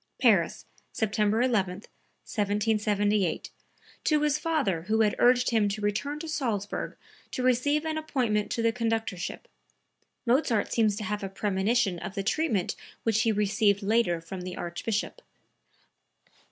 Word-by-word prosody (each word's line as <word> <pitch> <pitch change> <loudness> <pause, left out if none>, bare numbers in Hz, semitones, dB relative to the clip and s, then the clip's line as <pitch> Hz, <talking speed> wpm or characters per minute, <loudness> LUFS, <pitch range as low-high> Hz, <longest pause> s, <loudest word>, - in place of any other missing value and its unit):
(Paris, - - +3 0.3
September 215 +1 +1
11, 205 -8 +1 0.5
1778, 205 -2 0 0.5
to 305 -1 +2
his 300 0 +2
father 300 - 0
who 220 +1 +2
had 210 -2 +3
urged 245 0 +4
him 215 -3 +3
to 200 +2 -3
return 210 +8 -1
to 325 +2 -6
Salzburg 225 -10 -2 0.3
to 255 - -3
receive 285 +5 +2
an 315 0 -1
appointment 240 -9 0
to 230 - -1
the 230 - +4
conductorship. 225 -6 -2 0.8
Mozart 240 -3 +2
seems 215 -3 +3
to 210 - -5
have 210 +1 -2
a 195 - -4
premonition 195 0 0
of 195 - -6
the 195 - -2
treatment 220 - 0 0.3
which 220 -1 +2
he 225 - +3
received 205 0 +2
later 205 -5 +2
from 180 +3 -7
the 180 0 -6
Archbishop.) 205 - -3
215 Hz, 140 wpm, -28 LUFS, 200-245 Hz, 0.8 s, urged